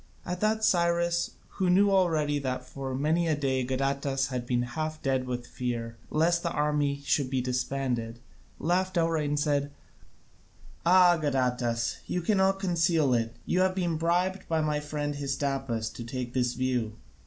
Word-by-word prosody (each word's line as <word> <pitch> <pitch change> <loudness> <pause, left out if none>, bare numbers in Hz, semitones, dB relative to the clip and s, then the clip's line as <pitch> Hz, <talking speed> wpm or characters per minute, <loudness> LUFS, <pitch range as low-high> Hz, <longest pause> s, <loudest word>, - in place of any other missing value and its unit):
At 180 0 -3
that 220 +1 +1
Cyrus, 170 -3 +2 0.2
who 185 -2 +2
knew 200 +3 +5
already 160 -6 +2
that 130 -2 -3
for 135 0 -5
many 160 +5 +1
a 155 - +2
day 135 -3 0
Gadatas 135 +1 -1
had 125 -2 -4
been 120 -1 +1
half 155 +5 -4
dead 130 -2 0
with 125 -1 -3
fear 120 -2 -4
lest 170 +2 +2
the 170 - -1
army 150 -2 0
should 140 -4 +1
be 130 -1 0
disbanded, 125 -2 -2 0.4
laughed 185 +2 0
outright 165 -3 +1
and 145 0 0
said, 145 -1 0 1.2
"Ah, 180 -1 +6
Gadatas, 125 -5 0
you 180 - -2
cannot 195 0 +2
conceal 165 -6 +2
it: 115 -1 0
you 180 - +1
have 185 0 +2
been 175 -4 0
bribed 180 +4 0
by 160 -1 +1
my 150 -1 0
friend 145 -1 -3
Hystaspas 135 -5 -2
to 120 - -7
take 125 +1 -5
this 125 -1 0
view." 125 -4 -1
145 Hz, 160 wpm, -28 LUFS, 130-170 Hz, 1.2 s, Ah